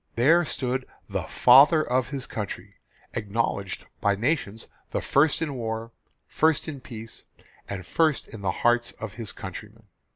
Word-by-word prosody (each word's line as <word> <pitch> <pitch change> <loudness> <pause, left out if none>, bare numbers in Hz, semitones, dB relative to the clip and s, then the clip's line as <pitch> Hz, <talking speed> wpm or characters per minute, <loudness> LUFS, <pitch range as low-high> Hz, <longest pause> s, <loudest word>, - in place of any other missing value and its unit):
There 160 +9 +5
stood 130 -2 -2 0.2
the - - -2
'Father 145 +6 +6
of 125 0 +1
his 135 -3 -4
Country' 105 -4 -6 0.4
acknowledged 100 -3 -2
by 100 0 +2
nations 115 -2 -1 0.2
the - - -1
first 155 +3 +2
in 150 -3 -3
war, 115 -2 -4 0.3
first 160 -1 +1
in 145 -4 -6
peace, 115 -2 -9 0.4
and 95 -3 -5
first 155 - +1
in 110 - -10
the 100 - -1
hearts 120 +5 +2
of 110 -3 -7
his 115 -3 -5
countrymen. 105 +4 -9
120 Hz, 150 wpm, -26 LUFS, 110-140 Hz, 0.4 s, Father